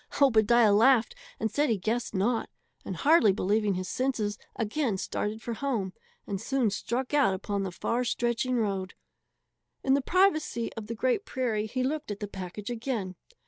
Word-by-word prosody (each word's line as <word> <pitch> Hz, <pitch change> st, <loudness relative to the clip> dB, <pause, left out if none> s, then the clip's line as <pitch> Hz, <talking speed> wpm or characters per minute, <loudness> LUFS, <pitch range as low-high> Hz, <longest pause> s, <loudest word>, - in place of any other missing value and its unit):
Obadiah 230 Hz, -4 st, +5 dB
laughed 235 Hz, -, +4 dB, 0.3 s
and 220 Hz, -, -1 dB
said 290 Hz, +5 st, +1 dB
he 225 Hz, -, +2 dB
guessed 225 Hz, +4 st, -2 dB
not, 225 Hz, +5 st, 0 dB, 0.3 s
and -, -, -5 dB
hardly 295 Hz, -8 st, +5 dB
believing 205 Hz, +1 st, +1 dB
his 185 Hz, 0 st, -3 dB
senses, 220 Hz, -5 st, -1 dB, 0.2 s
again 225 Hz, -1 st, -1 dB
started 215 Hz, +3 st, -3 dB
for 235 Hz, -, -3 dB
home, 225 Hz, -7 st, -2 dB, 0.3 s
and 200 Hz, -2 st, -4 dB
soon 255 Hz, -3 st, +1 dB
struck 245 Hz, +6 st, -3 dB
out 270 Hz, -10 st, +4 dB
upon 200 Hz, +1 st, -3 dB
the 190 Hz, -1 st, -3 dB
far 235 Hz, +7 st, -1 dB
stretching 240 Hz, +1 st, 0 dB
road. 195 Hz, -5 st, -1 dB, 0.9 s
In 265 Hz, -, +3 dB
the 280 Hz, -, +3 dB
privacy 310 Hz, -8 st, +1 dB
of 220 Hz, -2 st, -7 dB
the 230 Hz, -, -4 dB
great 255 Hz, -, +1 dB
prairie 230 Hz, -, -1 dB
he 255 Hz, +4 st, -2 dB
looked 300 Hz, +1 st, -2 dB
at 205 Hz, -1 st, -4 dB
the 205 Hz, -, -4 dB
package 195 Hz, +3 st, -6 dB
again. 225 Hz, -6 st, -3 dB
225 Hz, 170 wpm, -28 LUFS, 205-260 Hz, 0.9 s, Obadiah